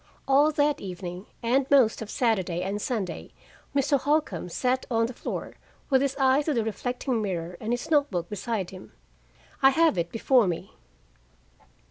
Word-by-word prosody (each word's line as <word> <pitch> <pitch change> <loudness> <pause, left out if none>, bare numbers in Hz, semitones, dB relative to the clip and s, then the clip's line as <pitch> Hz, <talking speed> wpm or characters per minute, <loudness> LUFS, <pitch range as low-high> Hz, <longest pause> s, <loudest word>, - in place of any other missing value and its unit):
All 280 +3 +5
that 295 0 +1
evening, 180 0 -7 0.2
and 260 +3 +2
most 255 -7 +4
of 220 - -6
Saturday 190 -9 0
and 200 +2 -3
Sunday, 200 -9 -3 0.5
Mr. 280 0 +2
Holcombe 290 - 0
sat 255 +8 -1
on 230 -2 +2
the 245 - -5
floor, - - -6 0.3
with 265 -1 +5
his 275 -1 0
eye 265 +1 +4
to 300 -1 -1
the 230 - +1
reflecting 245 +2 -2
mirror 180 -4 -3
and 220 - -3
his 245 +6 -3
note 290 -2 +4
book 175 -3 -3
beside 205 -1 -3
him. 185 0 -12 0.7
I 270 - +8
have 315 - +3
it 170 0 -1
before 235 -1 +3
me. 180 +2 -4
230 Hz, 165 wpm, -26 LUFS, 190-270 Hz, 0.7 s, I